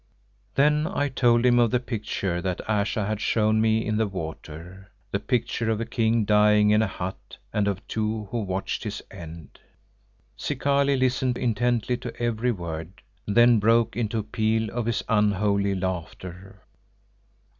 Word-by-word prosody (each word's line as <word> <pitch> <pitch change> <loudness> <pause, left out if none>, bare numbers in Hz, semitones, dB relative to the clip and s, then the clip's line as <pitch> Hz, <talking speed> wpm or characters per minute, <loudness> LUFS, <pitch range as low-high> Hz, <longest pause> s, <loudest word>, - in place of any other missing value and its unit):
Then 150 +2 +3
I 145 -6 -1
told 120 -2 +3
him 120 -1 +5
of 120 -1 +4
the 125 - +1
picture 105 -7 -3
that 90 -1 -3
Ayesha 105 0 0
had 105 0 -2
shown 110 -1 +2
me 110 0 +2
in 110 0 0
the 110 -1 +1
water; 90 +1 -8 0.2
the 100 - 0
picture 120 -1 -1
of 110 -1 0
a 115 - -2
king 115 -2 +1
dying 105 0 +4
in 105 +1 +4
a 110 - +1
hut 95 0 -7 0.2
and 105 -1 +1
of 100 0 -3
two 110 -1 -2
who 120 - -1
watched 95 +2 -3
his 105 -2 -5
end. 85 -5 -10 0.8
Zikali 140 0 +1
listened 130 -1 +1
intently 120 0 0
to 120 - -8
every 120 +1 0
word, 85 0 -6 0.2
then 120 +2 +5
broke 115 0 +3
into 115 -1 -1
a 110 - -1
peal 110 0 0
of 120 -1 -3
his 115 - 0
unholy 100 -2 +2
laughter. 95 +1 -6
110 Hz, 155 wpm, -25 LUFS, 100-120 Hz, 0.8 s, him